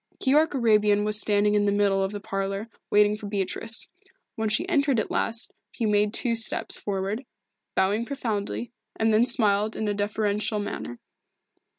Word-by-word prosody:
Keyork 295 +3 +3
Arabian 210 -4 +3
was 210 0 +3
standing 210 0 +2
in 205 -1 +3
the 200 - +2
middle 200 -1 +2
of 190 - -2
the 205 - -5
parlour 195 +2 -3 0.2
waiting 210 0 +4
for 210 -1 -8
Beatrice. 205 +3 -2 0.5
When 220 -1 -1
she 300 - 0
entered 280 -8 +2
at - - -3
last 230 +1 -2 0.2
he 230 - -2
made 210 0 +2
two 235 +1 0
steps 225 -1 0
forward, 200 +4 -3 0.5
bowing 205 +5 +1
profoundly, 235 -3 -3 0.2
and 220 0 +2
then 225 +3 +4
smiled 215 -2 +1
in 220 - -2
a 205 - +1
deferential 210 +1 -1
manner. 165 -11 -5
210 Hz, 165 wpm, -26 LUFS, 205-225 Hz, 0.5 s, waiting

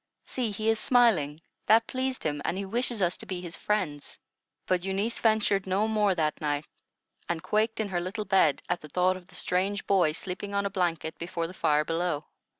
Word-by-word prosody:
See, 250 -4 -2
he 215 +1 -3
is 225 -1 +2
smiling; 170 - +3 0.2
that 225 +1 +6
pleased 260 +1 -2
him, 145 -2 -1
and 175 - -1
he 200 - -3
wishes 235 0 0
us 175 0 +1
to - - -11
be 185 -2 -3
his 175 -1 -6
friends." 180 -9 -2 0.5
But 180 -1 +1
Eunice 195 +4 -1
ventured 215 -3 +2
no 195 +3 +2
more 210 -3 +2
that 155 -3 -1
night, 145 0 -1 0.6
and 170 -1 -2
quaked 220 +1 +1
in 215 -2 -1
her 175 -2 -1
little 205 +4 -4
bed 185 -7 +3
at 175 0 -1
the 150 - -11
thought 180 +4 +2
of 180 -1 -11
the 190 - -15
strange 195 +3 0
boy 180 -6 +3
sleeping 190 +4 -4
on 200 0 +1
a 200 - -1
blanket 170 -4 -1
before 170 0 -3
the 170 - -7
fire 150 -4 +2
below. 165 -2 -1
185 Hz, 205 wpm, -28 LUFS, 165-210 Hz, 0.6 s, that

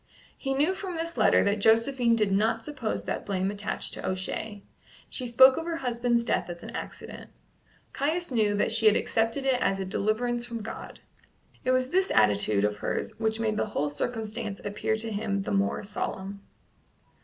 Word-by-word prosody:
He 270 -1 -2
knew 300 +7 +2
from 375 -2 -5
this 335 +1 -3
letter - - +4
that 200 +1 +1
Josephine 230 +2 +4
did 210 -3 +1
not 220 +3 +1
suppose 275 -7 -3
that - - -3
blame 190 -1 -1
attached 205 0 -4
to - - -6
O'Shea. 195 +2 -4 0.5
She 255 - -3
spoke 260 +2 +7
of 325 - -3
her 335 -1 -2
husband's 240 -3 0
death 180 - 0
as 170 0 -7
an - - -7
accident. - - -8 0.6
Caius 320 +4 -1
knew 215 -4 +2
that 205 - +1
she 225 0 +4
had 215 - +6
accepted 230 +5 0
it 260 -2 +2
as 195 0 +1
a 190 - -2
deliverance 235 +5 -1
from 235 -2 -5
God. 220 - -8 0.6
It 255 - -1
was 255 0 +2
this 375 +4 +2
attitude 105 -1 +3
of 105 0 0
hers - - -3
which 220 0 0
made 215 -1 0
the - - 0
whole 150 -8 -1
circumstance 215 +4 -3
appear 205 +2 -1
to 220 +1 -3
him 200 -1 -1
the - - -4
more 200 +1 0
solemn. 200 -1 -5
225 Hz, 185 wpm, -27 LUFS, 200-250 Hz, 0.6 s, spoke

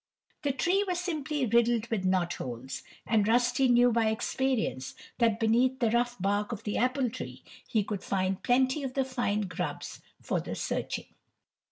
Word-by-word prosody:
The 285 - +1
tree 355 +9 +2
was 360 -1 0
simply 305 -6 -1
riddled 235 0 +3
with 205 -5 -1
knot 185 -2 +2
holes, 125 +1 -6 0.2
and 215 -2 +2
Rusty 245 +3 +3
knew 245 0 +5
by 225 -1 +2
experience 220 - -1 0.2
that 230 -2 +3
beneath 240 +4 +3
the 235 -4 +1
rough 240 0 +1
bark 205 +3 0
of 225 -1 -5
the 210 - -2
apple 255 0 +1
tree 255 - -7 0.2
he 215 -3 +1
could 200 -1 -4
find 190 0 -1
plenty 260 +3 +2
of 265 -2 -4
fine 240 -5 0
grubs 180 -2 -4 0.2
for - - -1
the - - -5
searching. - - -3
235 Hz, 165 wpm, -29 LUFS, 205-260 Hz, 0.2 s, knew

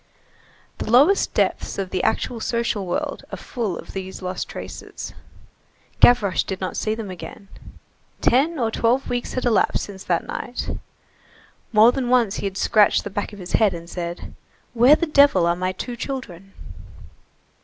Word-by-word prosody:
The - - -4
lowest 285 - +5
depths - - 0
of 190 -2 -3
the 185 - 0
actual 240 - -1
social 230 -4 -1
world 175 - -3
are - - -5
full 220 -9 -4
of - - -10
these 190 0 -6
lost 185 0 -4
traces. - - -8 0.9
Gavroche 210 -7 +5
did 190 - -5
not 185 - -4
see 215 0 -1
them 220 -4 -6
again. 195 +2 -10 0.7
Ten 300 +7 +2
or 230 -4 0
twelve 240 +4 +1
weeks 245 0 -2
had 255 - -2
elapsed 230 -4 +2
since 195 -1 -9
that 170 -2 0
night. 245 0 -5 1.0
More 220 +2 +7
than 250 -2 -2
once 240 -5 +3
he 200 - -2
had 190 -1 -6
scratched 210 +1 +3
the 205 - -6
back 205 +2 -3
of 205 - -11
his 180 -2 -8
head 210 -5 +3
and 170 0 -9
said: 175 0 -6 0.4
"Where 250 +5 +7
the 340 - -1
devil 280 - +5
are 170 0 +2
my 185 +1 -1
two 240 +6 -6
children?" 195 -8 -6
215 Hz, 165 wpm, -22 LUFS, 185-245 Hz, 1.0 s, More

